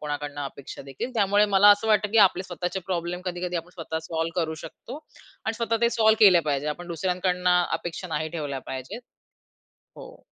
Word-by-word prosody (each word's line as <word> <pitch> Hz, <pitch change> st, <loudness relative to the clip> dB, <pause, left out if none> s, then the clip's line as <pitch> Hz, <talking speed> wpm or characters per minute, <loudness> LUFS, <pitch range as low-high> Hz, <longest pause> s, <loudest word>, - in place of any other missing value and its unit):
कोणाकडून 145 Hz, -1 st, -5 dB
अपेक्षादेखील, 140 Hz, -, -7 dB
त्यामुळे 205 Hz, -1 st, +3 dB
मला 205 Hz, +2 st, +7 dB
असं 205 Hz, +2 st, +3 dB
वाटतं 210 Hz, -1 st, +3 dB
की 225 Hz, -, +4 dB
आपले 185 Hz, -, -7 dB
स्वतःचे 180 Hz, +1 st, -4 dB
प्रॉब्लेम 175 Hz, -1 st, -3 dB
कधी-कधी 180 Hz, -1 st, -3 dB
आपण 170 Hz, +1 st, -6 dB
स्वतः 160 Hz, -2 st, -4 dB
सॉल्व्ह 165 Hz, +2 st, -2 dB
करू 160 Hz, -1 st, -2 dB
शकतो 240 Hz, -, -9 dB, 0.5 s
आणि 225 Hz, -, -1 dB
स्वतः 230 Hz, 0 st, 0 dB
ते 235 Hz, -, +4 dB
सॉल्व्ह 220 Hz, -1 st, +4 dB
केले 185 Hz, -4 st, +7 dB
पाहिजे. 145 Hz, -2 st, -2 dB
आपण 175 Hz, +4 st, -5 dB
दुसऱ्यांकडून 180 Hz, +1 st, -1 dB
अपेक्षा 180 Hz, 0 st, 0 dB
नाही 155 Hz, -1 st, -2 dB
ठेवल्या 145 Hz, -4 st, -4 dB
पाहिजेत. 130 Hz, -, -6 dB, 1.0 s
हो. -, -, -13 dB
180 Hz, 170 wpm, -25 LUFS, 160-200 Hz, 1.0 s, मला